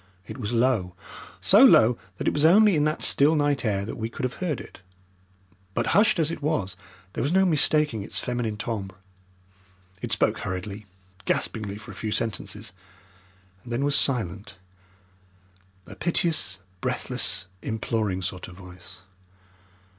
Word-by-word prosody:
It - - -9
was 105 -2 -3
low 115 -7 +1 0.5
so - - +6
low 115 +2 +7 0.2
that - - -4
it - - +2
was 145 - 0
only 200 +4 +6
in 150 -1 +2
that 155 0 -1
still 150 +3 +5
night 145 -3 +1
air 100 -4 0
that 110 - -6
we 115 0 -3
could - - -7
have 125 -1 -2
heard 165 -7 -1
it, - - -12 1.0
but, 115 - 0
hushed 210 0 +4
as 160 -1 +1
it 165 - -6
was, 140 - -1 0.4
there - - -3
was 140 - 0
no 190 0 +4
mistaking 150 - +2
its 100 - -4
feminine 120 -4 -2
timbre. 100 -5 -4 1.1
It - - -5
spoke - - +1
hurriedly, 100 +3 -5 0.4
gaspingly 105 -3 -1
for 105 - -11
a - - -10
few 110 - -4
sentences, 105 -4 -3 0.9
and 120 - -11
then 125 +4 0
was 145 0 +2
silent 105 -5 0 1.3
a - - -11
piteous, 165 - +1 0.2
breathless, 85 - -1 0.2
imploring 110 -4 -2
sort 90 -1 -4
of 90 - -12
voice. 90 -1 -12
115 Hz, 155 wpm, -25 LUFS, 100-145 Hz, 1.3 s, low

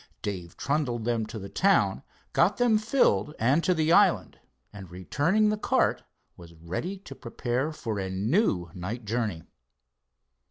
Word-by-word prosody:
Dave 90 -4 -5
trundled 135 -6 -1
them 115 -2 0
to 115 - -7
the 100 -2 -7
town, 190 - +2 0.3
got - - +3
them 235 -3 +3
filled 215 - +1
and 135 +9 +2
to 180 - +2
the 160 0 +1
island, 170 - +3 0.3
and, 95 -3 -10
returning 145 - +1
the 210 - 0
cart, - - +1 0.3
was 85 -1 -14
ready 95 - -5
to 185 -8 -11
prepare 125 +3 -3
for 115 -9 -4
a 95 -1 -3
new 95 - 0
night 105 +6 -6
journey. 105 -7 -2
120 Hz, 150 wpm, -27 LUFS, -, 0.3 s, got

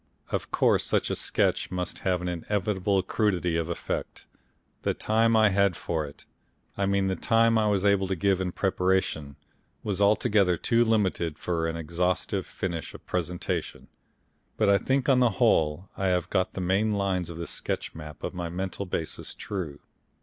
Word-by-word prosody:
Of - - -2
course, - - +3
such - - 0
a - - 0
sketch - - +1
must 90 -1 -4
have 90 -2 0
an - - -2
inevitable 95 +2 0
crudity 90 -4 0
of 85 0 -1
effect. 85 - -4 0.6
The - - 0
time 115 +1 +2
I 110 -1 +6
had 100 -2 +2
for 80 -2 -2
it 70 - -14 0.5
I 100 -1 0
mean 100 0 +2
the 95 0 0
time 115 +2 +3
I 110 -1 +3
was 100 -1 +1
able 100 -1 +3
to 95 - -1
give 95 +1 +1
in 90 -1 -1
preparation 90 -7 0 0.5
was 100 -2 -2
altogether 100 -3 +3
too 115 +7 +3
limited 95 -8 +1
for 85 -2 -1
any 80 0 -3
exhaustive 90 +3 -1
finish 85 -4 -4
of - - -13
presentation; 90 0 -3 0.7
but 110 -2 +3
I 100 0 +5
think 135 +4 0
on 135 -3 +5
the 125 -2 +5
whole 80 +4 +2
I 95 - -1
have 90 -2 0
got 95 - +1
the 95 - -4
main 95 +4 +1
lines 95 -4 0
of 85 - -7
this 85 - -4
sketch - - -3
map 75 -1 -10
of - - -3
my 85 -2 -4
mental 95 +2 -4
basis 80 -2 -3
true. 85 -8 -5
95 Hz, 180 wpm, -27 LUFS, 85-100 Hz, 0.7 s, I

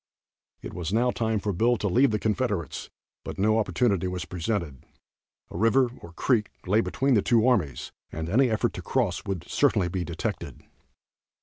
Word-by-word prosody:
It - - -7
was 85 -1 -4
now 120 +3 +2
time 110 -2 -1
for 100 0 -2
Bill 120 +7 +2
to 105 - -1
leave 130 +8 +4
the 110 - 0
Confederates, 105 - -2 0.3
but - - -7
no 110 +3 +3
opportunity 95 -1 +1
was 90 -1 -4
presented. 85 - -3 0.7
A - - -6
river, 120 +3 +3
or 85 - -11
creek, 110 +1 +1 0.2
lay 105 +4 +3
between 135 +3 0
the 105 - +4
two 115 +2 +3
armies, 85 - 0 0.2
and 80 0 -4
any 125 +8 +3
effort 110 - 0
to - - -6
cross - - -1
would 90 -3 -4
certainly 105 -11 +2
be 90 0 -2
detected. 85 -1 -5
105 Hz, 175 wpm, -26 LUFS, 90-115 Hz, 0.7 s, leave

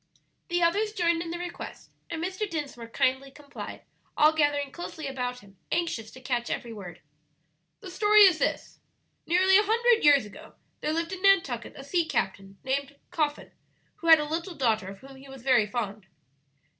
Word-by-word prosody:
The 350 0 0
others 420 +6 +1
joined 340 -4 +1
in 335 - -5
the 340 - -4
request, 350 0 -8 0.2
and 330 -1 -4
Mr. 375 +3 -3
Dinsmore 285 -8 -5
kindly 265 +2 0
complied, 285 +1 -10 0.3
all 305 +1 +5
gathering 290 -2 +1
closely 325 -2 -7
about 250 -2 -4
him, 195 -1 -19
anxious 330 -10 -1
to 255 - -13
catch 245 -2 -2
every 235 -1 -4
word. 180 -5 -10 0.8
"The 365 - -9
story 420 +3 +5
is 370 -6 +7
this: - - -2 0.5
Nearly 375 +3 +5
a - - +3
hundred 460 +2 +3
years 285 -5 +6
ago 205 - -13 0.2
there 305 - -2
lived 330 +3 -2
in 370 - -7
Nantucket 340 - +2
a 270 - -9
sea 335 +4 0
captain 195 -3 -3
named 275 +2 -2 0.2
Coffin, 300 -3 -2 0.5
who 335 - -7
had 320 -1 +9
a 300 - -1
little 335 +4 -4
daughter 220 -8 +1
of 195 0 -10
whom 270 0 -13
he 270 +1 -14
was 270 -2 -11
very 250 -5 +4
fond." 210 -3 -4
290 Hz, 180 wpm, -27 LUFS, 250-345 Hz, 0.8 s, had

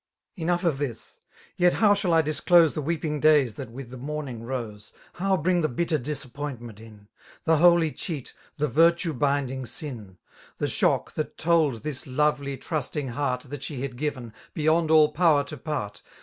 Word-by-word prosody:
Enough 175 0 -1
of 165 -6 +1
this» 125 -6 -5 0.4
Yet 180 -1 +4
how 210 -2 +4
shall 200 -3 0
I 165 -1 +4
disclose 160 +2 +4
The 155 - -3
weeping 150 0 -2
days 145 -6 +4
that 130 +2 -8
with 120 +1 -9
the 130 - -8
morning 140 -4 -5
rose^ 115 -4 -6 0.2
How 190 +1 +1
bring 175 +2 +1
the 155 - +1
bitter 155 +4 0
disappointment 130 -4 -6
in^«« 110 -2 -14 0.4
The 160 0 +3
holy 170 -1 +5
cheat, 150 -6 -6 0.2
the 150 0 +1
virtue 165 +4 +3
binding 135 -1 -1
sin»' 115 - -7 0.2
* - - -25
The - - -1
shock, - - +1
that 155 - -4
told 155 -8 +2
this 150 -4 -4
lovely^ 140 0 0
trusting 145 -2 -3
heaii> 125 0 -2
That 145 -1 -6
she 135 -2 -4
had 135 -3 -5
given, 130 -4 -4 0.2
beyond 160 +1 +2
all 155 -1 +6
power 155 -3 +3
to 155 - -8
part. 140 -8 -5
145 Hz, 175 wpm, -26 LUFS, 125-160 Hz, 0.4 s, all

